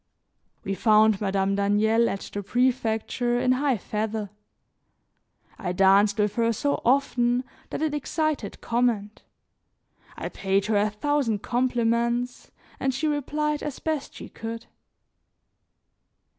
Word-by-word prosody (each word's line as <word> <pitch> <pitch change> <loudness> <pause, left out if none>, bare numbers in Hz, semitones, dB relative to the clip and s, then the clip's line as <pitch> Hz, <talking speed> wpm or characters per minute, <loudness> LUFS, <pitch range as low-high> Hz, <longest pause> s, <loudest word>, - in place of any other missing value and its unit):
We 195 - -2
found 215 0 +4
Madame 195 -1 +1
Daniel 210 +3 +2
at 195 - -4
the 205 - -3
prefecture 240 +1 0
in 250 - +2
high 260 -1 +2
feather. 210 0 -3 1.3
I 180 -4 -2
danced 195 +3 +4
with 210 -1 +1
her 230 0 +3
so 285 +6 -1
often 245 -2 +2 0.3
that - - -3
it 310 -2 0
excited 295 -5 -2
comment, 230 -3 0 1.0
I - - -4
paid 195 0 0
her 215 -1 +1
a 210 +1 +2
thousand 230 -1 -1
compliments 240 0 0 0.3
and 265 -1 0
she 310 - -2
replied 300 +1 -1
as 295 -3 -4
best 310 -3 -3
she - - -8
could. 230 +1 -7
230 Hz, 120 wpm, -25 LUFS, 205-255 Hz, 1.3 s, found